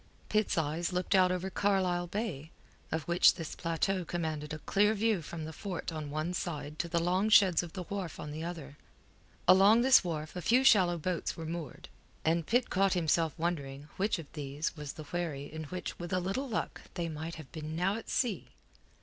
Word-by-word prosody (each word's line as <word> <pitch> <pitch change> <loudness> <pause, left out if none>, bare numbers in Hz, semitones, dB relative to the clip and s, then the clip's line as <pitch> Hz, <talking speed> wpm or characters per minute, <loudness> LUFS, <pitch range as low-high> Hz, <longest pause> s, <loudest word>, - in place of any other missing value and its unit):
Pitt's 215 -3 +1
eyes 160 +3 0
looked 180 +2 0
out 185 -1 +5
over 185 +1 -2
Carlisle 185 -3 +1
Bay, 175 -7 -4 0.4
of 160 -1 -1
which 170 +2 +5
this 160 -2 -6
plateau 175 +3 -1
commanded 155 -3 -3
a 155 - -3
clear 210 +7 +2
view 215 -3 +1
from 160 0 -6
the 160 - -7
fort 185 -3 -5
on 155 -2 -5
one 155 +4 -2
side 150 -4 -4
to 170 - 0
the 170 - 0
long 185 +5 +1
sheds 195 -5 +6
of 170 -2 -8
the 185 - -4
wharf 185 -3 -5
on 150 - -6
the 155 +2 -5
other. 160 -5 -7 0.7
Along 200 +5 +7
this 260 -2 +6
wharf 155 -2 -4
a 180 - -3
few 245 +9 +4
shallow 185 -9 +5
boats 175 +2 -2
were 165 - -5
moored, 165 -2 -6 0.4
and 165 0 +1
Pitt 245 +2 +2
caught 195 0 +3
himself 165 -3 +1
wondering 145 -4 -3
which 205 +2 +1
of 165 - -7
these 145 +1 -3
was 150 -3 -6
the 155 - -8
wherry 150 -3 -3
in 160 0 -5
which 180 +5 -6
with 175 0 -6
a 185 - +2
little 195 +10 -2
luck 220 - -3
they 170 -2 -2
might 160 +1 -5
have 145 -6 -11
been 155 +1 -6
now 185 +4 +1
at 225 - -7
sea. 230 -9 0
170 Hz, 200 wpm, -31 LUFS, 155-190 Hz, 0.7 s, Along